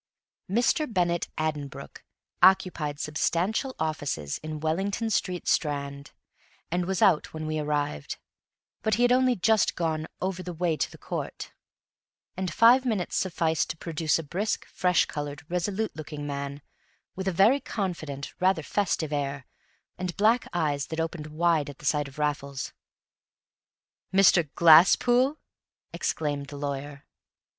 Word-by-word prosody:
Mr. 245 - +1
Bennett 175 -3 +1
Addenbrooke 145 -3 -4 0.4
occupied 175 -6 +3
substantial 185 - -1
offices 145 - -2
in 155 0 -6
Wellington 195 +8 -1
Street, 180 -4 -1
Strand, 140 -2 -1 0.6
and 175 +1 0
was 190 -2 +1
out 155 - +3
when 155 0 -4
we 155 0 -2
arrived; 145 - -2 0.6
but 220 - +1
he 240 - +1
had 245 - +4
only 255 0 +4
just 220 +2 +2
gone 160 -2 -1
"over 185 -1 -2
the 180 -1 -6
way 170 -1 0
to - - -1
the - - -13
court"; - - -5 0.8
and 185 -2 -3
five 235 +8 +6
minutes 215 -8 -1
sufficed 165 -4 0
to 165 - -4
produce 160 -1 0
a 165 - -4
brisk, 195 +8 -2
fresh 180 -2 +2
colored, 145 -1 -6
resolute 195 +5 -2
looking 150 -1 -7
man, 140 0 -5 0.5
with 190 +1 -4
a - - +2
very 205 +10 +4
confident, 165 - -4
rather 185 -3 +2
festive 165 -5 -1
air, 140 -2 -2 0.5
and 180 -1 -4
black 225 +4 +3
eyes 150 -5 -1
that 160 - -5
opened 160 -1 -3
wide 155 -1 +1
at 140 - -10
the 150 - -13
sight 145 0 +1
of 135 - -14
Raffles. 145 -2 -2 1.4
"Mr. 185 -5 +5
Glasspool?" 240 - +6 0.6
exclaimed 145 -2 -2
the 145 0 -8
lawyer. 140 0 -5
160 Hz, 140 wpm, -27 LUFS, 145-190 Hz, 1.4 s, five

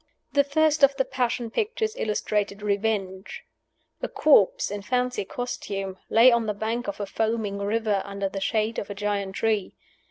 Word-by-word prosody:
The 285 0 +5
first 310 +2 +2
of 275 0 +6
the 265 -1 +1
Passion 240 -2 -1
pictures 440 - -1
illustrated 210 - -1
Revenge. 200 -2 -2 0.6
A - - -1
corpse, 215 -10 +4
in 205 0 -4
fancy 250 0 -1
costume, 195 -5 -5
lay 235 +3 +7
on 235 -2 +1
the 210 - -1
bank 225 +4 -2
of 200 - -4
a 205 - -2
foaming 220 -1 -1
river, 210 0 0
under 200 0 -3
the 195 0 -5
shade 220 +2 0
of 205 - -6
a 205 - -5
giant 200 -1 -2
tree. 215 -4 0
215 Hz, 165 wpm, -25 LUFS, 200-245 Hz, 0.6 s, lay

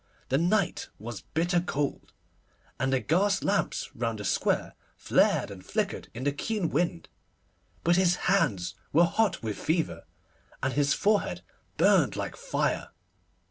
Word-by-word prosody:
The 135 - +2
night 180 +2 +1
was 110 -2 -7
bitter 175 - 0
cold, 145 -5 -3 0.7
and 130 +2 +1
the 130 - +3
gas 195 +9 +1
lamps 200 0 0
round 115 -1 -2
the 105 - -6
square - - 0 0.2
flared - - +2
and 95 -2 -10
flickered - - -2
in 125 - -5
the 145 - +2
keen 190 +4 -2
wind; 170 +2 0 0.8
but 175 +1 +4
his 180 -2 +4
hands 140 - +2 0.2
were 170 +4 +6
hot 190 - +1
with 110 -2 -3
fever, 160 +1 -1 0.6
and 135 0 +1
his 145 -1 +2
forehead 210 0 +1 0.3
burned - - +4
like - - -4
fire. - - -1
165 Hz, 140 wpm, -28 LUFS, 130-185 Hz, 0.8 s, were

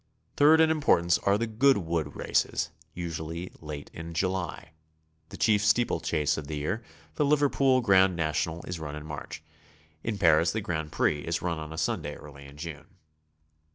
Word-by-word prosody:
Third 155 +2 +6
in 160 0 +5
importance 90 - +3
are 100 +1 +2
the 115 - -1
Goodwood 100 - +1
races, 85 - 0 0.2
usually 85 0 -5
late 75 -2 -8
in 85 0 -8
July. 90 -2 -2 0.6
The - - -9
chief 105 -2 +3
steeplechase 85 -9 +1
of 75 - -8
the 75 - -4
year, 90 +11 -2 0.3
the - - +3
Liverpool 140 -3 +3
Grand 95 -4 +4
National, 80 +1 -1
is 90 -2 -5
run 75 -2 -6
in 75 0 -8
March. 75 0 -7 0.6
In 115 -3 -2
Paris 85 -2 +4
the 110 - -1
Grand 80 -5 -3
Prix 75 - +1
is 85 +3 -3
run 85 -2 -1
on 80 0 -7
a 80 - -7
Sunday - - -2
early 70 -1 -12
in 70 +1 -14
June. 75 -1 -7
85 Hz, 165 wpm, -28 LUFS, 80-105 Hz, 0.6 s, Third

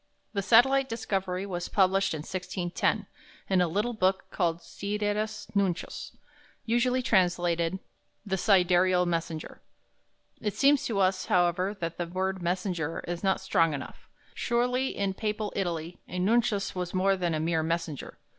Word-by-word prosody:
The 200 - 0
satellite 265 +6 +5
discovery 195 -4 -2
was 175 -3 -4
published 195 -2 +2
in 150 - -5
1610 180 0 -2 0.4
in 190 -2 +3
a 180 - +3
little 210 +8 -1
book 190 -3 +1
called 170 -3 0
"Sidereus 210 +1 -2
Nuncius," 190 -3 -2 0.5
usually 250 +2 +2
translated 175 -4 +2 0.5
"The 195 -2 0
Sidereal 180 -2 +4
Messenger." 165 -2 -3 0.8
It 210 -2 -2
seems 285 +1 +4
to 225 - -1
us, 185 -1 +1
however, 180 +3 +2
that 165 0 -3
the 175 - -1
word 190 +1 -2
"messenger" 175 -2 -2
is 175 +1 -4
not 190 -1 +2
strong 165 -2 +2
enough; 140 - -9 0.2
surely 250 +2 0
in 200 -1 0
Papal 210 +1 -3
Italy 170 -3 -3
a 180 - -6
nuncius 210 +1 +1
was 180 0 -4
more 195 +1 +3
than 175 -3 -1
a - - -1
mere 160 0 +1
messenger. 165 -2 -3
185 Hz, 145 wpm, -28 LUFS, 175-210 Hz, 0.8 s, satellite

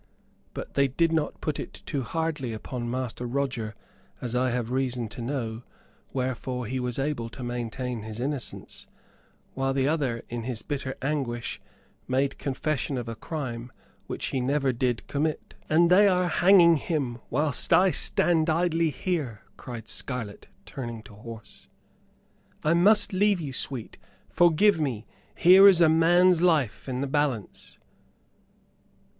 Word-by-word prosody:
But - - -7
they 140 0 +3
did 165 +5 +1
not 160 -2 -1
put 155 -2 -2
it - - -8
too 145 -7 -2
hardly 150 -2 -2
upon 120 +2 -5
Master 125 -1 -3
Roger, 120 -4 -2 0.4
as 120 -2 -5
I 125 +1 +2
have 120 -1 -2
reason 125 -3 -1
to 120 - -8
know, 115 -3 -3 0.5
wherefore 125 -1 -3
he 130 +4 -3
was 125 -1 -2
able 135 -4 -2
to 125 - -9
maintain 120 0 -4
his 110 +1 -7
innocence; 135 0 -4 0.7
whilst 135 0 -1
the 135 0 +2
other, 140 -7 -1
in 120 0 -4
his 115 -2 -4
bitter 135 -2 -4
anguish, 135 -5 -2 0.5
made 135 +2 0
confession 140 0 -2
of 120 -2 -4
a 115 - -4
crime 120 -3 -5 0.4
which - - -4
he 135 - -1
did 125 - -2
never 140 -2 +1 0.3
commit." 150 +2 -2 0.2
"And 170 +2 +4
they 200 +3 +7
are 180 -2 +2
hanging 175 -3 +6
him 135 -6 -2
whilst 145 0 0
I 180 +3 +6
stand 165 -1 +2
idly 165 0 +2
here," 145 - -3
cried 115 -3 -8
Scarlett, 120 -6 -4 0.2
turning 120 -4 -6
to 110 - -14
horse. 115 +1 -11 0.9
"I 155 - +3
must 205 +4 +4
leave 200 0 +3
you, 145 -5 -5
sweet; 125 -2 -5 0.3
forgive 175 +3 +4
me. 120 -7 -2 0.3
Here 190 +3 +8
is 190 -4 +6
a 165 -2 +6
man's 175 +2 +4
life 155 - +1
in 130 0 -2
the - - 0
balance." 135 -7 -2
135 Hz, 150 wpm, -27 LUFS, 120-160 Hz, 0.9 s, Here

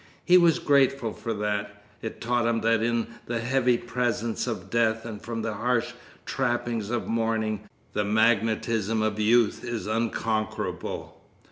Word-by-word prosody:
He 180 - +6
was 170 -3 +6
grateful 135 -5 +2
for 115 - -5
that. 105 0 -3 0.2
It 110 - -6
taught 120 0 +1
him 115 -1 +1
that 115 0 +3
in 115 0 +1 0.2
the 120 -1 -1
heavy 125 +1 +2
presence 120 -1 -1
of 120 - -4
death 115 -1 +2
and 110 -3 -6
from 115 -1 -4
the 110 -1 -2
harsh 120 +2 0 0.3
trappings 120 -4 -1
of 120 -1 -1
mourning 110 -2 -1 0.2
the 105 - +1
magnetism 110 0 +2
of 110 -1 -1
youth 110 +1 +3
is 120 -5 -4
unconquerable. 110 -1 -2
115 Hz, 145 wpm, -26 LUFS, 110-120 Hz, 0.3 s, He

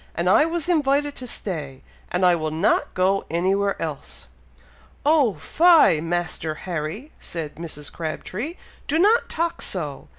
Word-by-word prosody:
and 170 +2 -1
I 190 +11 +5
was 335 -1 -2
invited 290 -3 +1
to 255 - -6
stay, 150 - -5 0.3
and 180 +1 +2
I 180 - +6
will 155 -2 -2
not 160 +5 +1
go 190 +2 +2
anywhere 195 +4 0
else!" 155 -4 -6 0.8
"Oh 290 -8 +4
fie, 325 - +5
Master 165 -2 -2
Harry!" 180 - -4
said 160 -3 -6
Mrs. 155 -3 -7
Crabtree. 185 - -4 0.3
"Do 300 - +1
not 420 +7 +4
talk 335 +1 -2
so! 150 -7 -3
185 Hz, 140 wpm, -23 LUFS, -, 0.8 s, I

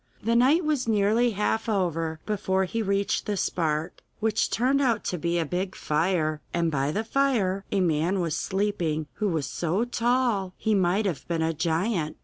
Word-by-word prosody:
The 230 +2 +1
night 280 +8 +4
was 295 -6 0
nearly 220 +3 +3
half 220 +2 0
over 165 -5 -1
before 190 -2 0
he 225 +5 -2
reached 200 -1 0
the 205 -1 -1
spark, 160 -3 -1 0.2
which 220 -1 +1
turned 265 +4 +2
out 235 -5 +1
to 180 - -3
be 170 +2 0
a 165 - 0
big 180 +4 -3
fire, 155 -1 0
and 170 -1 +1
by 140 0 0
the 215 +7 -1
fire 225 -7 +1
a 200 - +2
man 170 +2 +1
was 165 -4 -1
sleeping 185 -6 -1
who 210 - 0
was 160 -5 -1
so 180 +7 -1
tall 240 -6 0
he 220 - 0
might 195 +2 +2
have 175 -8 -3
been 165 -2 0
a 165 0 0
giant. 165 +1 -1
190 Hz, 180 wpm, -26 LUFS, 165-220 Hz, 0.2 s, night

